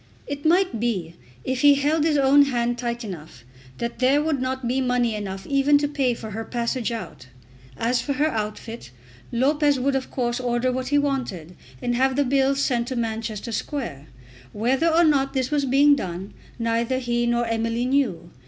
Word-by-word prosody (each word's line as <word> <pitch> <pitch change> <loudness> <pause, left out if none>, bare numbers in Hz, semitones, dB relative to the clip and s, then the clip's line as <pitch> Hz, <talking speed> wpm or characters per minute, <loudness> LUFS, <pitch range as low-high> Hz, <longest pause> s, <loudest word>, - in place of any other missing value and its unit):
It 285 +1 -6
might 355 - +2
be, 190 -8 -2 0.3
if 260 0 -2
he 285 -1 +7
held 295 +2 +1
his 310 -2 +2
own 280 +1 +6
hand 240 -2 -1
tight 235 0 -3
enough, 160 - -9 0.3
that 235 0 -4
there 260 +3 +4
would 300 -3 0
not 260 -1 -2
be 260 +2 0
money 245 -2 +1
enough 195 -2 -5
even 280 +1 +3
to 290 0 0
pay 275 -4 0
for 220 -1 -8
her 220 +2 -4
passage 235 0 -2
out. 180 - -7 0.5
As 240 +2 +1
for 280 - -2
her 295 +4 +1
outfit, 215 - -5 0.4
Lopez 285 +3 +2
would 270 +2 +1
of 265 - -2
course 240 -1 -1
order 245 0 0
what 255 0 -3
he 290 +2 +2
wanted 245 - -2 0.3
and 245 - 0
have 260 +2 +2
the 285 0 +2
bills 270 +1 +2
sent 240 -4 0
to 260 - -3
Manchester 225 -1 -3
Square. 225 - -4 0.5
Whether 255 +9 +1
or 330 +1 +4
not 275 -4 +2
this 260 0 -1
was 290 -2 +1
being 280 +3 +5
done 185 -4 -5 0.2
neither 230 +2 0
he 240 -1 0
nor 240 0 +1
Emily 230 +1 -1
knew. 230 -11 0
250 Hz, 185 wpm, -23 LUFS, 230-275 Hz, 0.5 s, he